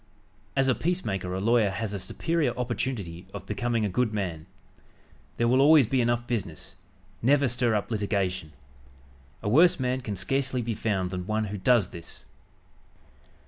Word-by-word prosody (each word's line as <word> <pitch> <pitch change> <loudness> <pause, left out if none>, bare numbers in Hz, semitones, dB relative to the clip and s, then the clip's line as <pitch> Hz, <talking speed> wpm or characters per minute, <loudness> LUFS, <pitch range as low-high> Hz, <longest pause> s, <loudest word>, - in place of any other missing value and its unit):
As 135 -1 +3
a 130 - +4
peacemaker 110 - -2
a - - -2
lawyer 110 0 +3
has 105 +2 -3
a 100 - -3
superior 150 - -1
opportunity 110 -8 -3
of 95 -2 -7
becoming 115 +1 -1
a 95 - -4
good 120 -4 +1
man. 85 -5 -3 0.9
There 120 - +2
will 130 +3 +4
always 150 -1 +7
be 130 +3 +1
enough 120 0 0
business. 95 -6 -4 0.5
Never 140 +3 +4
stir 120 -1 +1
up 105 +3 -2
litigation. 100 -7 -1 0.9
A - - -3
worse 160 +11 +5
man 130 0 -1
can 105 -4 -4
scarcely 130 +4 -1
be 115 0 -2
found 100 -4 -1
than 90 -1 -5
one 110 0 0
who - - -3
does 115 -3 +3
this. 85 -1 -9
115 Hz, 160 wpm, -27 LUFS, 95-125 Hz, 0.9 s, always